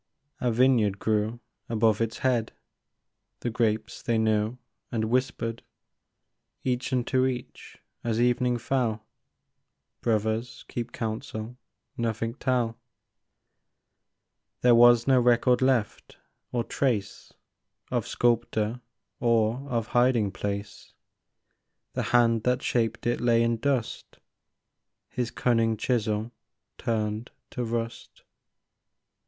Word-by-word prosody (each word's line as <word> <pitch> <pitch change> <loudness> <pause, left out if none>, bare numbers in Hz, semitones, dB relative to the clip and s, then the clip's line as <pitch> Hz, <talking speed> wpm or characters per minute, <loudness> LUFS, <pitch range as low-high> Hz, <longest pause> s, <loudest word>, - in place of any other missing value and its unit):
A 125 - +1
vineyard 115 -4 +3
grew 110 +2 0 0.3
above 110 -1 +2
its 115 0 -1
head; 120 -4 +1 0.9
The 120 - -2
grapes 110 -2 -1
they 115 -1 0
knew, 110 +1 +1 0.3
and 110 -1 -1
whispered 120 -2 -1 1.0
Each 125 0 -1
unto 130 +1 +2
each, 125 -1 -6 0.3
as 115 -1 0
evening 125 0 +2
fell: 115 -4 -1 1.0
Brothers, 110 +2 -1
keep 120 0 -4
counsel, 110 +1 -5 0.4
nothing 115 0 -1
tell! 125 -4 -1 0.9
" - - -55
There 125 -1 +6
was 120 0 +7
no 130 -2 +5
record 120 +1 +3
left, 130 -5 0 0.3
or 120 -1 0
trace 115 -7 -2 0.6
Of - - -1
sculptor 120 -1 0 0.4
or 115 +3 +1
of 115 -3 -1
hiding 120 -5 +3
place; 100 +1 -5 1.0
The - - -1
hand 115 -2 +4
that 125 +2 0
shaped 115 -1 0
it 120 0 0
lay 115 -1 +4
in 115 0 +1
dust, 130 -1 -2 0.9
His 125 -2 -2
cunning 115 -3 +1
chisel 110 -1 -1 0.5
turned 110 0 -2 0.2
to 125 - -3
rust. 115 0 -4
115 Hz, 105 wpm, -27 LUFS, 110-125 Hz, 1.0 s, was